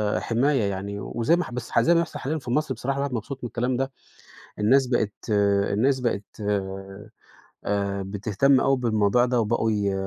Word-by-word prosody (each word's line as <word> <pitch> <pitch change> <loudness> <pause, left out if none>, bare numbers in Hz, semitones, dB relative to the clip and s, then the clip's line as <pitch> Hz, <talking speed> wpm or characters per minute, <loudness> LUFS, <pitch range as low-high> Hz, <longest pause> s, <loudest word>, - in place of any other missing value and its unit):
آآ - - +1
حماية 130 +2 +1
يعني 100 +1 -4
وزي 120 - +1
ما 175 - 0
اح - - -9
بس 120 -1 -6
زي 170 - +4
ما 170 - +4
بيحصل 170 - -3
حاليًا 150 +4 -2
في 125 -4 -6
مصر 150 +1 0
بصراحة 135 +2 -3
الواحد 140 -1 -2
مبسوط 125 +4 -5
من - - -2
الكلام 125 +2 -1
ده. 135 +1 -1 0.7
الناس 130 +6 +4
بقيت 115 -4 0 0.6
الناس 130 +6 +2
بقت 115 -5 -1 1.4
آآ 100 -1 -1
بتهتم 105 +7 +2
أوي 135 0 +3
بالموضوع 115 -1 +2
ده 125 -1 +1
وبقوا 110 0 +1
ي 100 -2 0
120 Hz, 180 wpm, -25 LUFS, 105-135 Hz, 1.4 s, زي